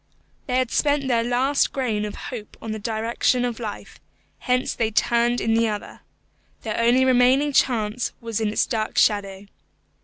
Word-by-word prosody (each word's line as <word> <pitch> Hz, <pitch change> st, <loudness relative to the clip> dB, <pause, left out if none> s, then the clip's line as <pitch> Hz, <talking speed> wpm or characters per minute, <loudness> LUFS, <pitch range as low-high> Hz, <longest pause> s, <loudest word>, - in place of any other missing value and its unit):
They 250 Hz, -1 st, 0 dB
had 255 Hz, -2 st, 0 dB
spent 285 Hz, -2 st, +1 dB
their 235 Hz, -3 st, +2 dB
last 255 Hz, +4 st, +1 dB
grain 225 Hz, -6 st, -1 dB
of 210 Hz, -, -6 dB
hope 220 Hz, -4 st, -8 dB
on 225 Hz, -, -6 dB
the 220 Hz, -, -4 dB
direction 230 Hz, +3 st, 0 dB
of 240 Hz, -1 st, -4 dB
life; 215 Hz, -3 st, -7 dB, 0.4 s
hence 250 Hz, 0 st, 0 dB
they 225 Hz, -2 st, -1 dB
turned 235 Hz, +2 st, +1 dB
in 225 Hz, -, 0 dB
the 230 Hz, 0 st, +3 dB
other. 210 Hz, -1 st, -5 dB, 0.6 s
Their 220 Hz, -1 st, -3 dB
only 240 Hz, +3 st, +4 dB
remaining 260 Hz, +3 st, +3 dB
chance 230 Hz, -2 st, +1 dB
was 230 Hz, -2 st, -4 dB
in 220 Hz, -, +1 dB
its 210 Hz, -, +1 dB
dark 220 Hz, -3 st, -3 dB
shadow. 200 Hz, -2 st, +1 dB
235 Hz, 165 wpm, -23 LUFS, 220-250 Hz, 0.6 s, only